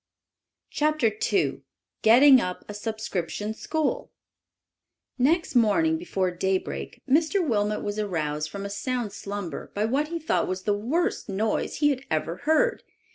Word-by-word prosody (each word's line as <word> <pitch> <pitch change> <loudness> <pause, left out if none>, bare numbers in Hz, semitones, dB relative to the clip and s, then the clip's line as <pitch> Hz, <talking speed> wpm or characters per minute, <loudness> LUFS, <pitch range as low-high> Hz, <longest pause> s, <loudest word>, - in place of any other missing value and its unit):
CHAPTER 300 -6 +2 0.2
II 390 - +1 0.4
GETTING 255 +3 +7
UP 180 -3 -4
A 210 - -6
SUBSCRIPTION 210 -1 -3
SCHOOL 310 +6 -2 1.1
Next 325 +3 +2
morning 320 +8 +3
before 190 - -1
daybreak 190 +1 -3
Mr. 320 +6 +2
Wilmot 210 -3 0
was 205 +1 -3
aroused 155 -7 -2
from 200 +2 -6
a - - -4
sound 235 0 -3
slumber 200 -5 -6
by 210 +1 +1
what 275 +6 0
he 335 +2 -3
thought 315 -1 0
was 185 0 -3
the 205 - +1
worst 265 - -1
noise 210 +3 -1
he 295 -1 +3
had 265 -1 -3
ever 160 +2 -1
heard. 320 - +2
220 Hz, 140 wpm, -26 LUFS, 200-300 Hz, 1.1 s, GETTING